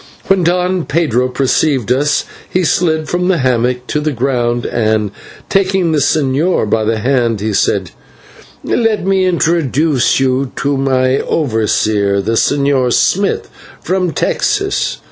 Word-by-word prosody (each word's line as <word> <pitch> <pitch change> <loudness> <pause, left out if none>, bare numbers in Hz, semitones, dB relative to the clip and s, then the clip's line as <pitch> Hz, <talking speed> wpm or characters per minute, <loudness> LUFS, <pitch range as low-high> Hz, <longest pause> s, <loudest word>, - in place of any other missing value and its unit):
When 195 -2 +2
Don 180 +1 0
Pedro 135 -6 +1
perceived 130 -1 0
us, 145 +4 +1 0.2
he 185 - 0
slid 160 -1 0
from 180 +1 -1
his 175 -6 +1
hammock 125 0 0
to 150 - -2
the 150 +1 -1
ground, 120 -2 -1
and, 110 -3 0 0.4
taking 190 -3 +1
the 155 - +1
señor 145 0 +1
by 110 +1 +1
the 110 +1 0
hand, 120 -2 0
he 105 +1 -2
said: - - 0 0.7
"Let 225 -5 0
me 190 -1 +2
introduce 160 -6 +1
you 130 0 0
to 140 +1 -1
my 130 -1 +1
overseer, 110 -6 0
the 100 +3 -2
Señor 140 0 +1
Smith, 190 +11 +1 0.3
from 185 -1 -1
Texas. 65 - -1
135 Hz, 135 wpm, -14 LUFS, 120-170 Hz, 0.7 s, When